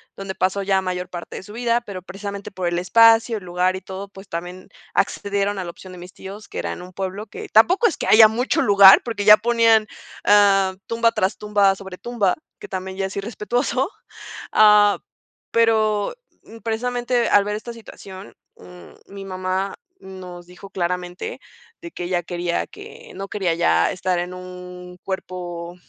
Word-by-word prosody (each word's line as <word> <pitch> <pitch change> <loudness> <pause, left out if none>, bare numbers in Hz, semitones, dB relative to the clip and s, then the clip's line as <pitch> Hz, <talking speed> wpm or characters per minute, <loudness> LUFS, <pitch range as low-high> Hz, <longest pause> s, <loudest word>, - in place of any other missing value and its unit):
donde 195 -1 -6
pasó 190 +2 0
ya 195 0 +2
mayor 180 -1 -4
parte 175 -1 -8
de - - -7
su 205 - -13
vida, 235 +1 0
pero 195 -6 -8
precisamente 200 +1 -7
por 185 -2 -3
el 175 0 -1
espacio, 225 +4 +5
el - - -16
lugar 180 +1 0
y 185 - -6
todo, 190 +1 -8
pues 195 -1 -14
también 180 +2 -7 0.2
accedieron 200 0 -1
a - - -3
la 170 - -6
opción 185 +2 -13
de 180 - -11
mis 180 +1 -11
tíos, 200 +3 -10
que - - -6
era - - -3
en - - -9
un 180 +1 -13
pueblo 195 +3 -5
que - - -9
tampoco 365 - +5
es 385 - -3
que - - -4
haya 220 0 +8
mucho 235 +4 0
lugar, 200 -1 +8
porque 220 -4 -4
ya 210 0 +9
ponían, 230 -2 +3 0.4
eh, 195 -2 +4
tumba 230 0 +2
tras 205 -3 -1
tumba 205 -2 +3
sobre 190 -1 -10
tumba, 225 -5 0 0.2
que - - -9
también 190 0 -6
ya 195 -1 -1
es 190 - -9
irrespetuoso. 240 - -1 0.6
Ah, 210 -1 +5 0.5
pero 220 -2 +2 0.5
precisamente 240 +1 -1
al 205 -1 +4
ver 210 0 -2
esta 235 +3 -7
situación, 200 -4 -12 0.2
mm, 180 0 -14 0.2
mi 195 0 -9
mamá 185 +1 -3 0.3
nos 180 -2 -10
dijo 180 +2 -13
claramente 180 - -4 0.4
de 340 - -9
que 180 - -7
ella 175 0 -1
quería 175 0 -2
que - - -13
no 195 +1 -6
quería 190 -5 -1
ya 85 - +2
estar 185 -1 -1
en 180 +1 -4
un 180 0 -10
cuerpo 175 -2 -6
195 Hz, 180 wpm, -21 LUFS, 180-215 Hz, 0.6 s, ya